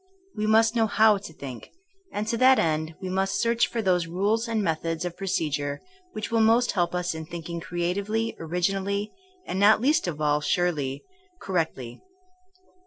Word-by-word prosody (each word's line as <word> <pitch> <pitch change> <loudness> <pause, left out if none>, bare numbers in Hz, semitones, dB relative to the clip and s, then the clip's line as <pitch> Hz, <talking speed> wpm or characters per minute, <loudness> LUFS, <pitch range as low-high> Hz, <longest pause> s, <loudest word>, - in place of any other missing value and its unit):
We 210 0 -1
must 225 +2 +4
know 225 -1 +3
how 215 -1 +4
to 195 - -10
think, 130 -6 -9 0.4
and 210 +1 -3
to 230 - 0
that 260 +2 +6
end 155 0 0
we - - -3
must 190 +1 0
search 235 0 +2
for 230 -2 -3
those 180 -3 +2
rules 205 +7 0
and 225 -2 0
methods 165 0 -2
of 175 -1 -4
procedure 145 -6 -2 0.3
which 215 +1 -5
will 230 - +2
most 230 +2 +4
help 175 -2 0
us 180 -1 -1
in 160 -1 -7
thinking 170 0 -6
creatively, 195 +7 -2
originally, 195 +5 -1 0.3
and 185 - -3
not 205 +2 +6
least 275 -2 +2
of 155 -3 -4
all 150 -1 +1
surely, 145 -5 -1 0.4
correctly. 160 -10 -3
185 Hz, 170 wpm, -26 LUFS, 165-215 Hz, 0.4 s, that